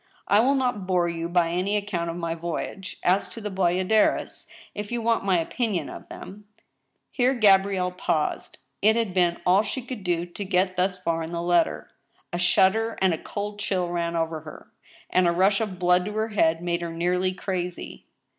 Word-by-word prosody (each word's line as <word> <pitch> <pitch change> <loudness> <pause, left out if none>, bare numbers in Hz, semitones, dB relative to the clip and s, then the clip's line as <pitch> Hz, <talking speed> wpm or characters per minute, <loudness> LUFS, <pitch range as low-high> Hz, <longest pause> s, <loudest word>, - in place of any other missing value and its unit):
" - - -32
I 205 - +5
will 265 +5 +3
not 245 -8 -1
bore 180 -2 +2
you 170 0 -4
by 170 -1 +2
any 190 +4 0
account 190 -5 -3
of 165 - -4
my 170 -1 -2
voyage. 170 +3 -5
As 185 +2 +2
to 230 - -9
the 210 -2 -5
bayadh 185 +1 0
es, 220 -1 +1 0.3
if 205 +1 -6
you 240 - -1
want 230 0 +1
my 190 -2 +3
opinion 180 - -1
of - - -10
them 205 +2 -10 0.2
— - - -51
" - - -51
Here 255 +1 +2
Gabrielle 195 -4 +3
paused. 160 -4 -2 0.2
It 220 +2 +5
had 225 -5 -1
been 175 -2 +2
all 185 +3 +5
she 220 +5 -4
could 245 -5 -7
do 175 -1 0
to 175 +3 -7
get 185 0 +1
thus 185 +1 0
far 165 -2 -1
in 160 +1 -5
the 170 - -3
letter. 175 0 +1 0.4
A 175 - -1
shudder 190 +5 +3
and 190 -2 +3
a - - -2
cold 205 0 -5
chill 185 -4 -1
ran 170 -1 -2
over 165 -1 -1
her, 155 0 -12 0.4
and 185 -1 +3
a - - +4
rush 195 +4 +3
of 205 -4 -3
blood 180 0 +3
to 210 - -4
her 220 +1 -1
head 165 -5 +1
made 170 0 -1
her 170 -1 -4
nearly 180 +2 0
crazy. 180 -2 -5
185 Hz, 210 wpm, -25 LUFS, 175-205 Hz, 0.4 s, I